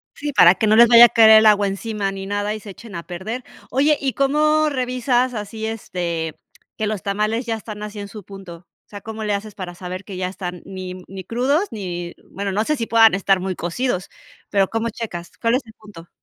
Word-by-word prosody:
Sí, 290 0 -4
para 180 -8 +7
que 215 - -1
no 215 +1 +4
les 235 +1 +8
vaya 235 0 +10
a - - -1
caer 225 -1 +6
el 220 0 +8
agua 205 -1 +5
encima, 200 0 -3
ni 195 0 -7
nada, 205 +1 -2
y 215 - -7
se 205 - -10
echen 210 +2 -12
a 170 0 -6
perder. 215 +8 -6 0.3
Oye, 290 +3 +3
¿y 270 -2 -1
cómo 305 +3 +2
revisas 255 -2 0
así, 220 +1 -5
este, 170 -7 -4 0.4
que 215 - -2
los 210 -3 -3
tamales 215 +4 -1
ya 230 - -1
están 215 -1 -8
así 210 0 -7
en 200 - -7
su 205 -2 -10
punto? 185 -3 -11 0.2
O - - -38
sea, 205 - -8
¿cómo 220 +1 -7
le 210 -1 0
haces 205 +1 -5
para 180 -3 -7
saber 185 +1 -7
que 195 - -8
ya 180 0 -2
están, 180 -2 -7
ni 185 -1 -7
ni 190 0 -8
crudos 280 - 0
ni? 175 -4 -5 0.2
Bueno, 200 0 -4
no 210 +3 0
sé 305 - 0
si 230 -3 -3
puedan 225 -1 +5
estar 195 0 +2
muy 185 0 -3
cocidos. 185 +3 -2 0.4
Pero, 195 -2 +2
¿cómo 225 +1 -2
checas? 210 -6 -6
¿Cuál 230 0 +2
es 260 - -2
el 220 - -15
punto? 200 -6 -14
210 Hz, 230 wpm, -21 LUFS, 190-230 Hz, 0.4 s, vaya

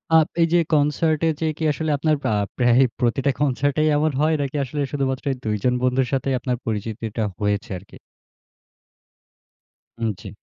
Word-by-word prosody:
আ - - +9 0.2
এই 165 - +5
যে, 175 - +6
কনসার্টে 155 +2 +2
যে, - - +1
কি 160 - -4
আসলে 155 +1 -3
আপনার 155 +2 +2
প্রা - - 0 0.3
প্রায়ই 125 +1 +4
প্রতিটা 135 +3 +1
কনসার্টেই 145 +2 +1
এমন 155 +1 +2
হয় 155 +1 +3
নাকি 140 +1 -3
আসলে 145 +3 -4
শুধুমাত্র 135 -2 -1
এই 130 - -3
২ 105 -1 0
জন 125 -1 +3
বন্ধুর 125 0 +2
সাথেই 135 0 0
আপনার 125 0 -2
পরিচিতিটা 110 0 -3 0.2
হয়েছে 105 -1 -1
আর 90 - -12
কি? - - -13 2.0
উম 115 - +1
জ্বি। - - -8
135 Hz, 165 wpm, -22 LUFS, 120-150 Hz, 2.0 s, আ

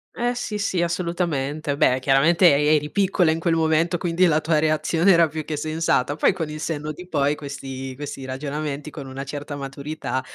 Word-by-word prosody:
Eh, 245 0 -1
sì, 225 -3 -3
sì 195 -3 -1
assolutamente, 165 -5 -2
beh 130 -2 +3
chiaramente 155 +6 +5
e 150 +2 +4
eri 150 0 -1
piccola 190 -4 +2
in 160 - -1
quel 165 0 +1
momento, 165 +2 +2
quindi 175 +2 +1
la 155 -3 +3
tua 155 -1 +2
reazione 160 +4 +2
era 170 -2 +4
più 155 0 -5
che 155 - -3
sensata, 155 -2 0
poi - - +3
con 165 -4 -4
il 155 0 -6
senno 150 -1 -3
di 180 +4 -10
poi 145 -3 +1
questi 135 -2 -7
questi 135 -1 -7
ragionamenti, 145 +2 -4
con 145 -3 -8
una 135 +1 -6
certa 145 +1 -6
maturità, 140 0 -4
155 Hz, 190 wpm, -23 LUFS, 140-170 Hz, -, chiaramente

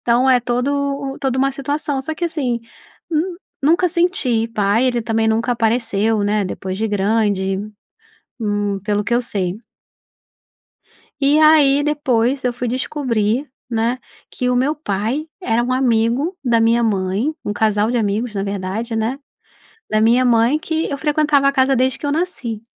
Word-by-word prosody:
Então, 245 +2 +2
é 255 -1 +5
todo 245 +2 -1 0.5
o - - -12
toda 265 -2 -1
uma 275 +1 +2
situação, 285 +1 -2
só 315 +4 -4
que 345 +2 -3
assim, 275 -8 -1 0.5
hum, 340 +3 -1 0.3
nunca 340 +5 +3
senti 290 -10 +1
pai, 215 +3 +1
ele 245 -2 0
também 225 0 0
nunca 230 +2 +1
apareceu, 225 -2 +1
né, 210 0 +1
depois 185 0 -5
de 220 +1 -1
grande. 200 -2 0 0.8
Hum, 205 -2 -1
pelo 210 -1 0
que 235 - -3
eu 240 - +3
sei. 195 -5 -3 1.6
E 285 +2 +4
aí, 300 -3 +5
depois 270 -3 0
eu 250 - +1
fui 245 +1 -4
descobrir, 255 -1 -1 0.2
né, 235 +2 0 0.3
que 250 0 -2
o 250 - +1
meu 275 +5 +1
pai 240 +2 -2
era 235 -8 +1
um 250 - -1
amigo 255 - +1
da 235 -2 +3
minha 230 +1 +3
mãe 200 +5 0
um 205 - -2
casal 210 0 +1
de 245 - 0
amigos 215 +1 -1
na 195 - -1
verdade, 200 +4 -3
né, 225 +5 -1 0.7
da 215 - +1
minha 240 +3 +4
mãe, 235 +3 +3
que 320 +1 -2
eu 280 - -3
frequentava 295 -1 +2
a - - +4
casa 270 0 +2
desde 260 +1 +1
que - - -5
eu 285 - 0
nasci. 270 - -3
240 Hz, 165 wpm, -19 LUFS, 220-275 Hz, 1.6 s, é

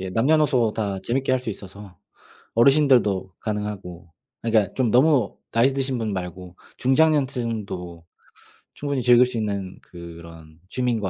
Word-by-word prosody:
예. 95 0 -5
남녀노소 130 -1 +2
다 100 -3 -3
재밌게 130 +5 -1
할 130 - +3
수 125 -2 -8
있어서 100 -2 -10 0.6
어르신들도 120 - +3
가능하고 100 -5 -5 0.3
아 115 - -1
그니까 110 -3 +3
좀 125 -4 +1
너무 130 -3 +3 0.2
나이 125 +4 +3
드신 135 -2 -2
분 110 -3 -2
말고 90 -1 -7 0.2
중장년층도 120 - 0 0.7
충분히 140 -3 -3
즐길 125 +1 +6
수 125 -2 -5
있는 100 -3 -3
그런 85 -2 -12
취미인 125 -3 0
것 95 -2 -2
110 Hz, 305 characters per minute, -23 LUFS, 95-130 Hz, 0.7 s, 즐길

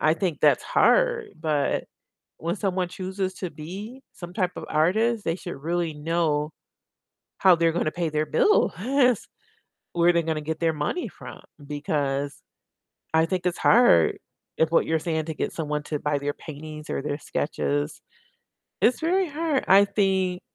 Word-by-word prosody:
I 155 - +4
think 170 -4 -2
that's - - +4
hard, - - +3
but 150 -3 0 0.5
when 170 +3 -2
someone 185 -2 -1
chooses 190 +1 -3
to 185 -3 -4
be 195 - -8
some 175 0 -10
type 185 -3 0
of - - -6
artist, 215 +8 +2
they 165 - 0
should 180 -2 -7
really 165 +2 -2
know 150 -1 0 0.9
how 185 -2 +6
they're 165 0 +2
gonna 160 -2 0
pay 170 -1 -1
their 155 0 0
bills, 420 - +3 1.2
where 175 0 +4
they're 170 - +2
gonna 160 -1 -2
get 160 +1 -4
their 165 -1 +2
money 155 - -2
from, - - -11 0.3
because 145 -1 -2 0.8
I 160 0 +4
think 180 +1 -2
it's 180 - 0
hard 215 - +5 0.4
if 160 0 +2
what - - +3
you're 160 0 +1
saying 160 -1 -2
to 160 - -4
get - - -2
someone 150 -2 -3
to 150 -1 -3
buy 150 0 0
their 145 +1 -2
paintings 155 0 -9
or - - -2
their 145 0 -3
sketches. 75 - -2 0.8
It's 245 - +3
very 365 +3 +2
hard. 300 -2 -1
I 200 +1 +7
think 190 -3 0
165 Hz, 160 wpm, -25 LUFS, 150-190 Hz, 1.2 s, I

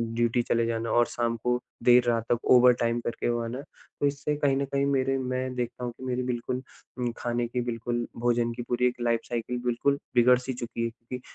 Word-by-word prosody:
Duty 120 +1 +2
चले 115 0 +1
जाना 115 0 -2
और 120 0 +4
शाम 115 -1 -1
को 125 0 +1 0.2
देर 125 0 +7
रात 115 -1 +2
तक 120 - +3
ओवरटाइम 120 -1 +5
करके 120 0 -2
वो 120 0 0
आना। 120 +4 -4 0.4
तो 145 - +1
इससे 145 +1 -1
कहीं 140 -2 +2
न 140 - 0
कहीं 140 0 0
मेरे 135 -1 +1
मैं 130 0 -2
देखता 125 0 -4
हूँ 120 - -2
कि 130 - -11
मेरी 125 0 -1
बिल्कुल 125 +1 -2 0.4
उम, 120 -1 -1
खाने 120 0 -1
की 125 +1 -2
बिल्कुल 120 0 -2
भोजन 120 0 +1
की 120 - -6
पूरी 125 0 +2
एक 125 0 -3
लाइफ 115 -1 +2
साइकिल 120 +1 -2
बिल्कुल 140 +4 +1 0.2
बिगड़-सी 125 +2 +4
चुकी 115 -1 -3
थी। 120 +2 -8
120 Hz, 205 wpm, -27 LUFS, 120-125 Hz, 0.4 s, देर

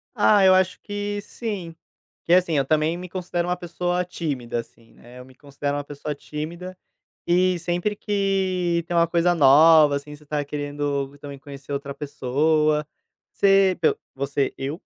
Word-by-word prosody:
Ah, 205 -2 +4
eu 185 - +7
acho 185 0 +1
que 205 0 -4
sim. 200 -7 -6 0.5
Que 170 - +3
é - - +9
assim: 170 -4 +1
eu 135 - +1
também 155 +3 +1
me 180 0 -8
considero 175 -1 -3
uma 180 - -1
pessoa 175 +1 -2
tímida, 135 -9 -4
assim, 115 0 -13
né, 125 +1 -15
eu 125 - -11
me 130 - -17
considero 145 0 -4
uma 145 - -3
pessoa 145 +1 -6
tímida. 170 +6 -7 0.5
E 180 0 +2
sempre 175 +5 -2
que 190 -4 0
tem 175 - -1
uma 170 - +5
coisa 175 +1 +2
nova, 150 +1 +6
assim, 150 +1 -6
você 150 +1 -19
tá 150 0 -2
querendo 145 -1 -3
também 140 -1 -9
conhecer 140 0 -11
outra 140 0 -4
pessoa, 150 +2 0 0.5
você 195 -2 +4
pelo 160 - +2 0.2
Você: 140 0 -1
eu. 140 +6 -5
160 Hz, 170 wpm, -23 LUFS, 145-180 Hz, 0.5 s, é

